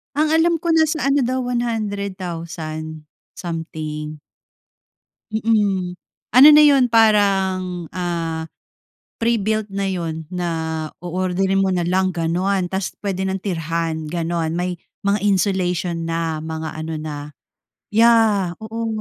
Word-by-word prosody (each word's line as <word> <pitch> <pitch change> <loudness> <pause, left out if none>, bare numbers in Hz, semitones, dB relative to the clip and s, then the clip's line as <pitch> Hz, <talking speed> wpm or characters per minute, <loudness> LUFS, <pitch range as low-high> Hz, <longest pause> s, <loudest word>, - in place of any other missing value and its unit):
Ang 305 +1 +2
alam 330 +2 +3
ko 340 - -2
nasa 315 -1 +3
ano 275 -3 +3
daw, 255 +1 0
100,000 180 -10 -4 0.2
something. 155 -3 -5 1.1
Mm. 205 -5 +1 0.4
Ano 265 +4 +10
na 300 0 +8
yun 275 -4 +5
parang, 195 -6 +2
ah, 165 -3 -3 0.7
pre-built 220 -2 0
na 195 0 -1
yun 165 -4 -4
na 180 -1 -3 0.5
oorderin 185 +2 0
mo 190 - +2
na 175 -2 0
lang, 185 +1 +2
ganon! 180 +3 0
Tas 190 0 -3
pwede 190 -2 -2
nang 190 0 -2
tirhan, 165 -4 -2
ganon! 165 -1 -1
May 180 +1 -2 0.3
mga 200 0 +2
insulation 180 -4 0
na, 165 -1 -2
mga 160 0 -4
ano 160 0 -4
na, 155 -1 -5 0.8
yah, 220 -6 +4
oo. 225 +1 -4
185 Hz, 115 wpm, -21 LUFS, 165-215 Hz, 1.1 s, Ano